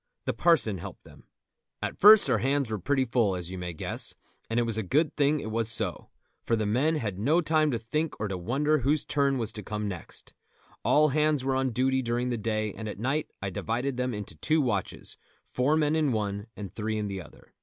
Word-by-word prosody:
The - - 0
parson 130 - +2
helped - - -9
them. - - -17 0.5
At - - -3
first 210 +1 +9
our - - +2
hands 135 -3 0
were 110 - -2
pretty 135 +7 +1
full, 115 -5 +1
as 90 0 -5
you 95 - -6
may 90 -1 -4
guess, 80 - -3 0.3
and 115 +1 +1
it - - +3
was 115 -2 0
a 110 - 0
good 145 - +1
thing 145 +1 +2
it 110 - -5
was 115 0 0
so, 110 -5 0 0.3
for 115 - +1
the 110 -1 -1
men 130 +10 +2
had 105 -10 -3
no 150 +11 +3
time 155 -2 +2
to 125 - 0
think 150 +8 -3
or 105 - -1
to 95 - -3
wonder 140 - +1
whose 145 +4 +1
turn 140 -2 +1
was 115 -3 -2
to 105 - -7
come 105 +1 -4
next. 90 -5 -8 0.5
All 155 +1 +4
hands 150 -1 +1
were 135 - +1
on 130 0 +1
duty 130 +2 +1
during 120 +1 -1
the 120 - -1
day, 110 -1 -1
and 110 +1 -6
at - - -6
night 135 +8 -1
I 95 - -2
divided 125 +8 -2
them 125 0 -1
into 105 -6 -5
two 155 - +1
watches, 105 - -2 0.3
four 140 +5 +1
men 150 0 +2
in 155 -4 +2
one 105 -1 -2
and 100 -3 -7
three 110 0 -2
in 105 -1 -2
the 95 -1 -4
other. 75 - -17
120 Hz, 230 wpm, -28 LUFS, 105-145 Hz, 0.5 s, first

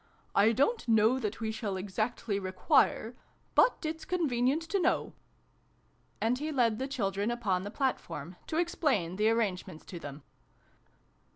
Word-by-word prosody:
" - - -36
I 205 +3 +6
don't 280 - +1
know 225 +3 +4
that 220 -3 -3
we 220 -1 -2
shall 215 -3 -3
exactly 205 +2 -2
require 220 - +2 0.4
but - - +4
it's 320 +1 -3
convenient 285 -4 +1
to 390 +4 -1
know." 355 - +1 1.1
And 240 +3 +1
he 305 +2 -2
led 235 -6 +2
the 265 - -2
children 205 -5 -1
upon 215 -7 0
the 200 - -5
platform, 185 - -3
to 315 - -2
explain 275 - 0
the 215 +1 +3
arrangements 190 -7 -1
to 175 - -8
them. 145 -2 -8
225 Hz, 150 wpm, -31 LUFS, 195-270 Hz, 1.1 s, I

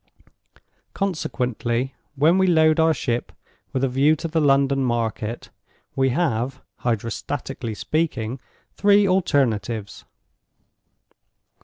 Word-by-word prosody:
Consequently, 130 - -2 0.2
when 160 +7 +4
we 190 - +3
load 160 -2 +4
our 160 0 +5
ship 125 -5 -2 0.4
with 130 - -1
a - - +4
view 140 +5 +3
to 165 +2 -4
the 160 0 0
London 135 -1 +3
market, 115 -2 -2 0.4
we 135 0 +2
have 130 -3 -1 0.2
(Hydrostatically 115 0 -3
speaking) 130 -6 -2 0.3
three 205 0 +4
alternatives. 120 - 0
135 Hz, 100 wpm, -23 LUFS, 120-160 Hz, 0.4 s, our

